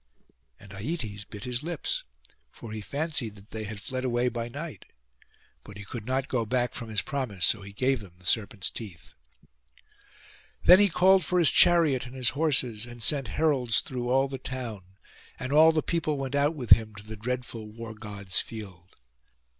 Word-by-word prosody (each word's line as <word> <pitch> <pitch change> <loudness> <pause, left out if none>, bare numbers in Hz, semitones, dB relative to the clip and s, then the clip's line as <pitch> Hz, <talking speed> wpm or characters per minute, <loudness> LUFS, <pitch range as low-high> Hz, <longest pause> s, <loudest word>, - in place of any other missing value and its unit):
And 100 - -14
Aietes 105 - -4
bit 105 0 -9
his 125 0 -3
lips, 175 - -2 0.5
for 115 - -10
he 110 0 -5
fancied 140 -4 -1
that 100 +1 -17
they 110 -1 -4
had 105 0 -6
fled 130 +4 -4
away 125 -1 +1
by 120 0 -4
night: 145 - -7 0.8
but 105 -1 -11
he 105 - -9
could 110 +2 -7
not 130 +1 0
go 120 -3 0
back 125 +2 0
from 115 -2 -6
his 110 -1 -1
promise; 130 -11 -2
so 110 - +2
he 100 0 -9
gave 130 +5 +1
them 95 -4 -13
the 90 - -19
serpents' 100 0 +1
teeth. 100 -8 -8 1.5
Then 180 +2 +9
he 205 -1 +5
called 185 +1 +5
for 180 +2 0
his 170 -4 +6
chariot 155 -8 +4
and 125 - -11
his 125 -3 +2
horses, 125 -6 0
and 120 -1 -8
sent 140 -4 +2
heralds 135 -7 +2
through 125 -2 -4
all 135 +2 +3
the 135 -1 -6
town; 110 -8 -6 0.4
and 130 +2 -4
all 160 +2 +8
the 155 -1 0
people 155 -3 -1
went 135 -1 -4
out 145 +3 +2
with 125 -6 -7
him 110 -1 +6
to 105 - -10
the 110 +1 -7
dreadful 115 0 -4
War 115 0 -8
god's 100 -3 -3
field. 95 -5 -9
120 Hz, 185 wpm, -28 LUFS, 105-140 Hz, 1.5 s, Then